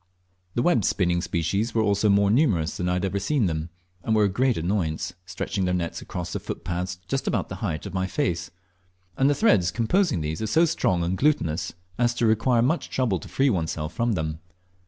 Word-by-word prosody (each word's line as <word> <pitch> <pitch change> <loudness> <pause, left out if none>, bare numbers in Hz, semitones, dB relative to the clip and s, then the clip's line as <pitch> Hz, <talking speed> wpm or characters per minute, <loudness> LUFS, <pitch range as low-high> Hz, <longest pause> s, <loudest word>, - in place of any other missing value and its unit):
The 120 - +1
web 125 - +3
spinning 90 -1 +1
species 100 +8 -1
were 110 - +3
also 100 0 +2
more 100 0 +4
numerous 105 - +2
than 90 0 -1
I - - +1
had 90 +2 0
ever 100 +1 -1
seen 135 +3 +1
them, 80 -1 -2 0.3
and 110 - 0
were 105 - +4
a 100 - +3
great 125 +5 +1
annoyance, 85 -2 -1
stretching 95 0 -2
their 90 0 +1
nets 85 -2 -3
across 90 -1 -5
the - - -2
footpaths 90 +1 -4
just 135 +6 -2
about 105 - 0
the 95 - -6
height 80 -6 -2
of 100 - -7
my 95 0 0
face; 105 - -1 0.7
and 135 +5 +3
the 145 - +2
threads 100 - +3
composing 120 - +1
these 75 +4 -3
are 110 - -1
so 160 +10 +4
strong 95 - +1
and 90 +2 -1
glutinous 90 - +1 0.3
as 120 0 +2
to 120 - +1
require 115 +2 +3
much 155 +7 0
trouble 115 -8 0
to - - -11
free 135 0 +2
oneself 80 -3 -2
from 115 +3 0
them. 80 -3 -3
100 Hz, 210 wpm, -25 LUFS, 85-120 Hz, 0.7 s, more